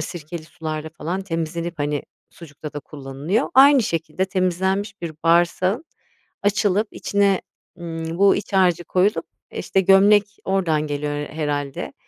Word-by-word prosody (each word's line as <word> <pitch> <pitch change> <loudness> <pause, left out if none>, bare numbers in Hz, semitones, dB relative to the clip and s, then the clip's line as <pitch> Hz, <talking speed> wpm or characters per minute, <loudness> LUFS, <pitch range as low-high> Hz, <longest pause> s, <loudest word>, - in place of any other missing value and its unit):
sirkeli 155 0 -6
sularla 155 -1 -5
falan 175 +5 -2
temizlenip, 165 -2 -4
hani, 145 0 -1 0.3
sucukta 150 -2 -10
da 145 - -5
kullanılıyor. 145 - -3
Aynı 275 0 +7
şekilde 165 0 -1
temizlenmiş 190 +2 -1
bir 165 -2 -4
bağırsağın 175 - +2 0.6
açılıp 205 +1 +2
içine, 200 -2 +1 0.4
ımm, 165 0 -5
bu 200 0 +5
iç 200 0 -6
harcı 180 -3 +3
koyulup, 185 +4 +1 0.3
işte, 195 - 0
gömlek 195 +2 +6 0.2
oradan 165 -6 +1
geliyor 145 0 -2
her 145 0 -3
herhâlde. 145 -3 -3
175 Hz, 130 wpm, -22 LUFS, 155-195 Hz, 0.6 s, Aynı